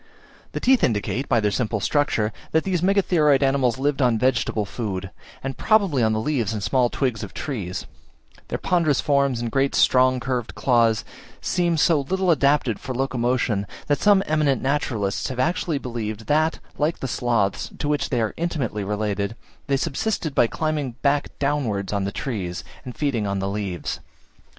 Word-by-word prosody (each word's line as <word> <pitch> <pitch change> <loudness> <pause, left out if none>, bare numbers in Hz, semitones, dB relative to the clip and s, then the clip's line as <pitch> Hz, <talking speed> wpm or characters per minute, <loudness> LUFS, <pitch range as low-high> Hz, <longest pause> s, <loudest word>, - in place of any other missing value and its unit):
The - - -2
teeth 260 0 +3
indicate, 115 +4 0
by 115 - +4
their 105 -1 +1
simple 110 0 -1
structure, 110 -3 +1 0.2
that 160 - +3
these 185 -3 0
Megatheroid 175 -7 +3
animals 135 -3 +2
lived 140 +1 0
on 120 -3 +3
vegetable 110 -3 +1
food, 100 -3 -4 0.3
and 135 0 -4
probably 200 - +3
on 110 -1 +3
the 110 - 0
leaves 115 -4 0
and 105 -2 -4
small 120 +3 +2
twigs 125 -6 -1
of 105 - -8
trees; 100 - -4 0.6
their - - -2
ponderous 170 -6 +1
forms 140 -4 +2
and 120 -1 -3
great 135 +2 +1
strong 130 0 +4
curved 125 -2 -3
claws 115 -4 +2 0.3
seem 175 -2 0
so 155 -1 +4
little 185 +5 +1
adapted 140 -6 +2
for 130 - -5
locomotion, 125 -5 0 0.2
that 145 - 0
some 205 -2 +5
eminent 150 -3 +2
naturalists 120 -8 -1
have 130 - -5
actually 170 +1 0
believed, 110 -4 -5
that, 155 +5 +2 0.2
like 155 +3 +1
the 135 - -4
sloths, 115 -5 0
to - - -3
which 150 0 0
they 120 -3 +1
are 110 - -1
intimately 140 -11 -2
related, 105 +1 -2 0.3
they 140 -1 +2
subsisted 165 +2 -2
by 120 - +4
climbing 150 -2 -2
back 145 0 +2
downwards 120 -9 -1
on 100 -1 0
trees, 100 -9 -4 0.2
and 125 -2 -8
feeding 125 -8 0
on 100 0 -1
the 95 0 -2
leaves. 100 -4 -3
130 Hz, 170 wpm, -23 LUFS, 110-145 Hz, 0.6 s, some